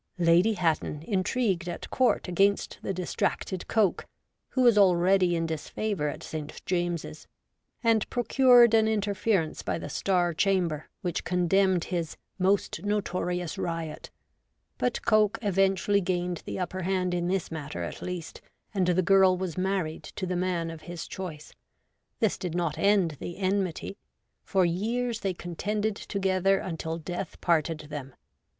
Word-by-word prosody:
Lady 175 +5 +4
Hatton 160 -4 -1
intrigued 190 -2 0
at 175 - -6
Court 255 -6 +2
against 195 +3 +1
the - - -3
distracted 185 0 -2
Coke, 215 -5 +1 0.4
who 260 - +1
was 240 -3 +6
already 185 -2 +4
in 165 0 0
disfavour 160 +2 -2
at 145 - -5
St. 155 -1 -6
James's, 175 -3 -2 0.6
and 225 -2 +2
procured 245 -1 +5
an 220 -1 +5
interference 205 -5 0
by - - -2
the - - -6
Star 180 -3 +1
Chamber, 175 -4 0
which 175 -3 -2
condemned 180 0 +2
his 170 -3 -3
' - - -48
most 200 0 0
notorious 180 -4 -2
riot; 165 -3 -4 0.3
' - - -49
but 250 - -1
Coke 215 -1 +3
eventually 195 0 +2
gained 180 -2 -2
the - - -4
upper 185 0 -3
hand 185 0 0
in 175 -1 0
this 190 -2 -1
matter 145 - -5
at 85 - -6
least, 180 -3 -6 0.3
and 190 -3 +1
the 180 +1 +3
girl 190 -1 +5
was 180 -3 -3
married 185 -4 -1 0.2
to 190 - -2
the 180 0 -2
man 175 -2 -1
of 165 -1 -9
his 175 0 -7
choice. 160 -5 -7 0.7
This 220 - +1
did 175 -2 -4
not 165 -3 -1
end 190 -6 +3
the 175 - -6
enmity. 190 -1 -1 0.5
For 190 -2 +2
years 225 +7 -1
they 195 -4 -2
contended 205 +5 -2
together 195 -1 +1
until 165 -3 -4
death 175 +2 -5
parted 165 -2 +1
them. 135 -3 -6
185 Hz, 150 wpm, -28 LUFS, 170-200 Hz, 0.7 s, was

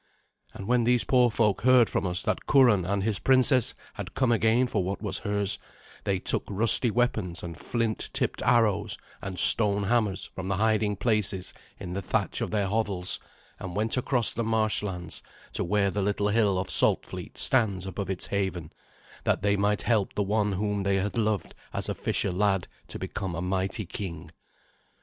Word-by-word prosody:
And 95 - -7
when 120 +2 +2
these 120 +1 +3
poor 125 -2 +3
folk 105 -3 +1
heard 125 -1 +5
from - - -1
us 90 -1 -1
that - - -2
Curan 120 -10 +4
and 100 +1 -1
his 105 -2 0
princess 130 -1 +3 0.2
had - - -8
come 130 -3 +2
again 115 +2 +3
for 105 -6 -1
what 95 +2 -3
was 105 -3 -3
hers, 100 -2 -2 0.5
they 100 - +1
took - - -2
rusty 110 +3 +6
weapons 110 -7 -1
and 85 -1 -6
flint 115 +3 -3
tipped - - -2
arrows 105 -4 +2 0.2
and 95 -1 -6
stone 100 +2 +5
hammers 105 -2 0
from 95 0 -6
the 100 - 0
hiding 110 -1 +1
places 100 -3 0 0.3
in 90 -3 -6
the 100 - -3
thatch 95 - -2
of - - -2
their 105 -2 0
hovels, 100 -3 -2 0.4
and 90 -2 -7
went 110 +2 0
across 125 -2 0
the 115 - -2
marshlands 105 -6 -2 0.3
to - - -2
where 100 +2 +1
the 100 - -2
little 100 +1 0
hill 105 -3 +2
of 95 +1 -2
Saltfleet - - +1
stands 100 -8 +2
above 95 0 -5
its 95 -2 -2
haven, 95 -5 -3 0.5
that - - 0
they 100 0 +2
might 105 +1 0
help 110 -5 0
the 105 - +1
one 105 0 0
whom 105 +1 -1
they 100 0 +1
had 100 +2 -2
loved 110 -4 -1 0.2
as - - -2
a - - -1
fisher 100 - -1
lad 95 0 0 0.2
to - - -7
become 95 -4 -5
a - - -4
mighty 95 +3 -2
king. 85 -3 -7
105 Hz, 180 wpm, -27 LUFS, 95-110 Hz, 0.5 s, rusty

